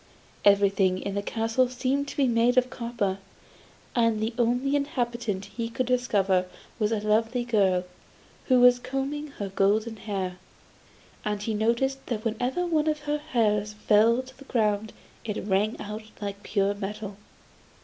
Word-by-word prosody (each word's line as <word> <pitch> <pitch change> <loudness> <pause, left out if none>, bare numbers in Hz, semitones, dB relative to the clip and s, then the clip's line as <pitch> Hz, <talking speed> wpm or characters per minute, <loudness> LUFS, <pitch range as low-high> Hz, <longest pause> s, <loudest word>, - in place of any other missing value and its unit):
Everything 195 -2 +4
in 200 - -4
the 200 - -1
castle 225 +4 +1
seemed 265 +3 -1
to - - -8
be 275 -2 +3
made 240 +1 +3
of 255 0 +3
copper, 230 -5 -2 0.8
and 230 -2 +3
the 220 +2 -1
only 245 +4 +2
inhabitant 240 -8 -2
he 230 +3 -5
could 255 +2 -1
discover 200 -7 +2 0.3
was 210 0 +1
a 220 - +1
lovely 225 +3 +1
girl, 195 -6 +2 0.6
who 255 -2 +5
was 245 0 +7
combing 270 +4 -3
her 200 -1 -3
golden 215 +4 +1
hair; 190 -4 -3 0.9
and 210 -1 -2
he 220 - -1
noticed 235 +5 0
that 225 -2 -3
whenever 250 +9 -1
one 315 -3 +1
of 305 -1 0
her 295 0 -1
hairs 210 -7 0
fell 215 +2 +4
on 260 - -3
the 275 - -12
ground 215 -3 0 0.3
it 210 -3 -4
rang 210 +3 +1
out 210 +1 -5 0.2
like 200 -1 -5
pure 200 -1 +1
metal. 205 0 -5
225 Hz, 155 wpm, -27 LUFS, 205-250 Hz, 0.9 s, was